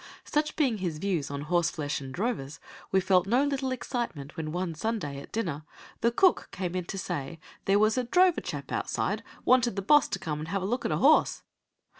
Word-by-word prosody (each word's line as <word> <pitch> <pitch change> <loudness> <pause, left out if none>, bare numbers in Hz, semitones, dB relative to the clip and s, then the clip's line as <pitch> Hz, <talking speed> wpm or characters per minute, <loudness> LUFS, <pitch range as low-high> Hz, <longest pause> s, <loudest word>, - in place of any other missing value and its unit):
Such 300 +1 0
being 260 -9 +1
his 175 -4 -2
views 170 -5 -1
on 140 0 -4
horseflesh 155 -2 0
and 135 -1 -7
drovers, 165 - -3 0.3
we 190 - +4
felt 185 0 +3
no 245 +6 +3
little 275 -2 -1
excitement 235 - -4
when 155 -1 -4
one 175 0 -2
Sunday, 160 -6 -3
at - - -13
dinner, 165 -10 -2 0.4
the 235 - +3
cook 365 +10 +3
came 180 -2 -3
in 180 -1 -2
to 195 - -5
say 145 -3 -4 0.3
there 195 +1 +4
was 215 +4 +3
"a - - 0
drover 360 +8 +4
chap - - -6
outside - - -1 0.2
wanted 245 -4 +4
the 195 - -3
boss 295 +8 +5
to - - -2
come 150 -2 -4
and 155 - -5
have 195 +2 -2
a - - -1
look 245 +6 -1
at - - 0
a - - +1
horse." - - +4
190 Hz, 210 wpm, -28 LUFS, 155-240 Hz, 0.4 s, boss